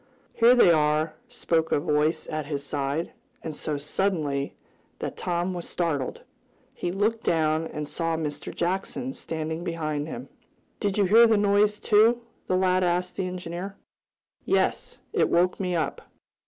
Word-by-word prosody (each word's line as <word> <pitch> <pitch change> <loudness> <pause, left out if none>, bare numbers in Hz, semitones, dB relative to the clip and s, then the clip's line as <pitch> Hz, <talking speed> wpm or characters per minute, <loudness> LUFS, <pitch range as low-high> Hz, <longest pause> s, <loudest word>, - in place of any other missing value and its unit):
"Here 235 +2 +6
they 235 -8 +7
are," 155 0 +2
spoke 165 -9 0
a - - +3
voice 150 +2 +1
at 155 -2 -4
his 140 -2 -3
side, 140 +3 -2 0.3
and 160 -2 -5
so 150 -1 -3
suddenly 150 -2 -1 0.4
that - - -4
Tom 175 +1 -1
was 175 -1 -6
startled. 155 -7 -2 0.5
He 175 - -3
looked 215 +4 0
down, 160 0 +1
and 150 -2 -5
saw 165 0 -1
Mr. 150 -2 -4
Jackson 195 +9 -2
standing 160 +1 -4
beside 155 -4 -2
him. 240 - -7 0.5
"Did 200 -1 -1
you 205 - +4
hear 225 +5 +7
the 220 -1 +4
noise, 205 +1 +3
too?" 225 +3 +4 0.2
the 185 - +2
lad 185 0 +3
asked 180 +1 0
the 185 - -1
engineer. 180 +2 -5 0.7
"Yes. - - 0 0.2
It - - +2
woke 180 +1 +2
me 180 -2 -1
up. 160 - -1
170 Hz, 155 wpm, -26 LUFS, 155-195 Hz, 0.7 s, they